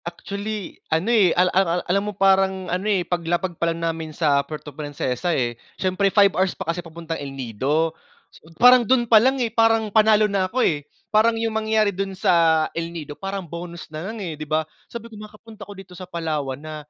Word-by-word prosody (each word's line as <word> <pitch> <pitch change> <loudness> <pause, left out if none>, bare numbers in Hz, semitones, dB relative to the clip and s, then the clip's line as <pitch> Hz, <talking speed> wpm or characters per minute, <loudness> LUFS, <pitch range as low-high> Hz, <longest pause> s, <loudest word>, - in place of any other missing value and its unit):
Actually, 200 +3 -6
ano, 170 +9 +1
eh, 205 -6 +5
al 180 0 +3
al 190 - +5 0.2
ang - - -3
alam 195 +3 +1
mo - - -6
parang 190 -1 +3
ano, 190 +4 -1
eh, 190 -4 +1
paglapag 175 +1 -1
pa 170 - +2
lang 165 0 -3
namin 165 -1 -3
sa 145 -4 +3
Puerto 150 0 -9
Princesa, 145 0 -3
eh, 120 -7 -1 0.2
siyempre, 190 +1 +1
5 200 -1 +4
hours 190 0 0
pa 190 - -5
kasi 175 - -5
papuntang 165 -1 -7
El 135 -1 -7
Nido. 135 +7 -1 0.4
So, 160 - -18
parang 250 0 +7
dun 240 +1 +2
pa 225 -2 +6
lang, 265 +3 +2
eh, 235 -4 -1
parang, 225 -2 +2
panalo 215 -1 +5
na 195 -2 0
ako, 255 +5 +1
eh, 145 -2 -1 0.2
parang 225 +2 +4
yung 225 0 -1
mangyari 220 -1 +1
dun 195 0 -4
sa 165 -3 +3
El 165 0 -3
Nido, 160 -3 -7
parang 195 +3 -5
bonus 170 +1 -8
na 160 +6 -5
lang, 225 - -6
eh, 165 - -4
di 155 0 -8
ba? 155 0 +1 0.2
Sabi 235 -1 -8
ko, 230 - -13
makakapunta 215 -1 -12
ako - - -7
dito 190 -2 -12
sa 180 0 -10
Palawan 155 -6 -3
na 155 +1 -8
185 Hz, 215 wpm, -22 LUFS, 160-210 Hz, 0.4 s, parang